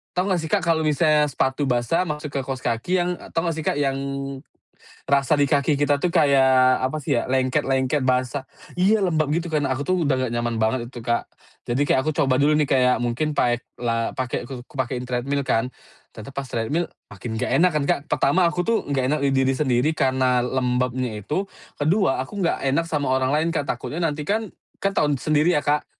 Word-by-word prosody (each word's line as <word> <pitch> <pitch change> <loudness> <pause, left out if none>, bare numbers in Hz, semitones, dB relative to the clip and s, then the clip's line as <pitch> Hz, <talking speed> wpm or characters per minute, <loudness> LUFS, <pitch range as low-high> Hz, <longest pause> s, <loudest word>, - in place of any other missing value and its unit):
tahu 180 +1 +1
nggak 175 - 0
sih 160 - -5
Kak 195 -5 +2
kalau 165 -1 +2
misalnya 150 -1 +3
sepatu 130 +2 -1
basah 120 +7 +1
masuk 150 0 -4
ke 135 - -1
kaus 135 -1 -3
kaki 115 +10 -2
yang 175 - -1 0.2
tau 165 +1 0
gak 165 - 0
sih - - -2 0.2
yang, 135 -2 +1 1.1
rasa 140 +1 +3
di 145 - +4
kaki 145 0 +2
kita 145 0 +2
tuh 175 +1 0
kayak 130 -5 +4
apa 130 +4 -1
sih 140 -3 0
ya - - -4
lengket 130 +2 +1
lengket 130 +2 +1
basah. 130 +1 0 0.4
Iya 210 +4 +4
lembab 155 -4 +1
gitu 170 0 -2
karena 145 -3 0
aku 145 - -3
tuh 185 - +2
udah 130 -2 +1
gak - - -6
nyaman 120 -1 -1
banget 120 +2 0
itu 120 - -8
Kak, 120 -1 -1 0.4
jadi 120 +3 -1
kayak - - +3
aku 155 - +1
coba 135 -2 +2
dulu 150 +2 +4
nih 150 - +2
kayak 125 -1 +3
mungkin 120 +6 -1
paek 120 0 +1 0.2
la 115 -1 -1
pakai 125 -1 -3
ku 130 -2 -7
ku - - -20
pakein 125 0 -2
treadmill 135 +3 -1
kan, 115 +2 +1 0.5
ternyata 110 +5 -9
pas 140 - -2
treadmill 145 +11 -1 0.2
makin 100 +4 -7
gak - - -2
enak 180 0 +4
kan 150 - +1
Kak - - +3
pertama 175 +7 +3
aku 180 +1 -2
tuh 230 - +3
gak 130 -2 +1
enak 150 - +1
di 135 - +2
diri 135 0 +2
sendiri 130 +1 +1
karena 130 -2 +2
lembabnya 125 -2 -1
itu 190 - -2 0.3
kedua 155 -1 +2
aku 200 +9 -8
gak 170 - 0
enak 145 +5 +2
sama 145 -4 -1
orang 130 0 +1
lain 160 +2 +1
Kak 150 -3 0
takutnya 165 - -3
nanti 150 -2 -1
kan 220 0 -1 0.3
kan 195 - +2
tau 150 - +3
sendiri 155 +4 +2
ya 145 - +2
Kak. 150 0 +1
140 Hz, 210 wpm, -23 LUFS, 125-155 Hz, 1.1 s, di